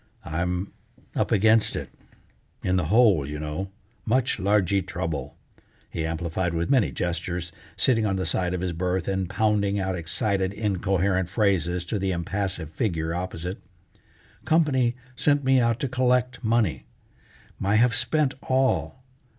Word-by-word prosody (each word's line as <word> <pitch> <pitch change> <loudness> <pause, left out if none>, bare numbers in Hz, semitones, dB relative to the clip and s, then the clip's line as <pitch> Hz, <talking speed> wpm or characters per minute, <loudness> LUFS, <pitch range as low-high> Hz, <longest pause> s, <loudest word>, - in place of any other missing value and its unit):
"I'm 90 +4 -2 0.4
up - - 0
against 110 +2 +4
it, - - -5 0.7
in 90 - +1
the 90 -3 +1
hole, 105 - +4
you 75 +2 -5
know, 75 +6 -4 0.3
much 125 +1 +1
largee 100 -1 +2
trouble," 85 -7 -4 0.5
he 80 -1 -2
amplified 85 +2 -2
with 85 +7 -1
many 130 -6 +3
gestures, 85 0 -3 0.3
sitting 115 -4 +3
on 100 -2 +1
the 95 -1 -1
side 90 0 0
of 90 - -3
his 90 -2 -2
berth, 90 +1 -1
and 95 -2 -1
pounding 100 -1 +1
out 95 -1 -1
excited, 95 +3 -1
incoherent 95 -3 0
phrases 90 -4 +1
to 105 +4 -2
the 95 0 0
impassive 90 -2 -3
figure 80 -6 -1
opposite. 90 +1 -4 0.8
"Company 130 -7 +2 0.2
sent 145 +2 +2
me 130 0 +4
out 115 -1 +2
to 140 - 0
collect 125 0 +1
money. 110 -6 +1 0.7
My 100 +2 +1
have 115 +2 +4
spent 145 +4 +1 0.2
all. 130 0 +1
95 Hz, 140 wpm, -25 LUFS, 85-115 Hz, 0.8 s, against